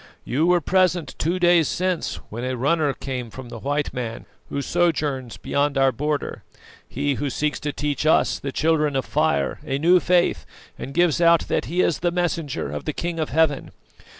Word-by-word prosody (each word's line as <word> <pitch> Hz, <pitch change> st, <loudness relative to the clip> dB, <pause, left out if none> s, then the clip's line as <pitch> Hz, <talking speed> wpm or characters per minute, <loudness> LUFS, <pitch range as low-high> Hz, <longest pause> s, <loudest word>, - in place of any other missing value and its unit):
You 150 Hz, +7 st, +1 dB
were 175 Hz, -1 st, +4 dB
present 180 Hz, -1 st, +1 dB
two 170 Hz, +4 st, 0 dB
days 175 Hz, -3 st, +4 dB
since 180 Hz, +2 st, -1 dB, 0.2 s
when 115 Hz, +3 st, -5 dB
a 130 Hz, 0 st, -2 dB
runner 145 Hz, +3 st, +2 dB
came 130 Hz, -3 st, -5 dB
from 125 Hz, +2 st, -10 dB
the 115 Hz, -, -8 dB
white 145 Hz, +4 st, -2 dB
man 120 Hz, -2 st, -5 dB, 0.2 s
who 140 Hz, -, -3 dB
sojourns 145 Hz, -8 st, 0 dB
beyond 140 Hz, 0 st, 0 dB
our 135 Hz, -1 st, +4 dB
border, 150 Hz, +4 st, -3 dB, 0.5 s
he 140 Hz, +2 st, -1 dB
who 140 Hz, +2 st, -2 dB
seeks 150 Hz, +2 st, -1 dB
to 150 Hz, -, -3 dB
teach 150 Hz, +1 st, -2 dB
us, 160 Hz, -, +3 dB
the 140 Hz, -, -4 dB
Children 150 Hz, -1 st, +1 dB
of 135 Hz, -, 0 dB
Fire, 155 Hz, +1 st, 0 dB
a 135 Hz, -3 st, -2 dB
new 175 Hz, +5 st, +5 dB
faith, 175 Hz, -, +2 dB, 0.3 s
and 135 Hz, -, -8 dB
gives 175 Hz, -2 st, +3 dB
out 170 Hz, -1 st, +5 dB
that -, -, 0 dB
he 175 Hz, +3 st, 0 dB
is 170 Hz, -, +1 dB
the 175 Hz, -, +1 dB
messenger 165 Hz, -, -2 dB
of 75 Hz, -, -5 dB
the 155 Hz, -, -2 dB
King 170 Hz, +1 st, -3 dB
of 155 Hz, -, -1 dB
heaven. 150 Hz, -1 st, +1 dB
150 Hz, 190 wpm, -23 LUFS, 135-170 Hz, 0.5 s, new